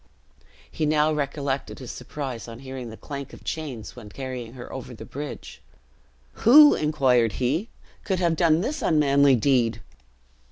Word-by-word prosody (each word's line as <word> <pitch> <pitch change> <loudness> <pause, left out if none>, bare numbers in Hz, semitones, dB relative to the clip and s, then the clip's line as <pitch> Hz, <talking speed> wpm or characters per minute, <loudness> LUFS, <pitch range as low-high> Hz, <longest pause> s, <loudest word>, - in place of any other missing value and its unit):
He 155 - -1
now 155 0 +3
recollected 140 -2 -3
his 125 -3 -7
surprise 130 -2 -6
on 115 -1 -9
hearing 130 -2 -7
the 110 - -10
clank 140 -1 -7
of - - -13
chains, 140 -9 -5
when 115 -4 -11
carrying 125 -1 -6
her 125 -2 -10
over 130 -2 -7
the - - -10
bridge. 145 0 -8 0.8
"Who," 295 +6 +9
inquired 130 -7 +2
he, 150 - -1 0.3
"could 190 -3 -1
have 170 -2 +1
done 160 0 +3
this 285 +9 -3
unmanly 140 -3 +4
deed?" 120 -2 +2
140 Hz, 150 wpm, -25 LUFS, 125-155 Hz, 0.8 s, Who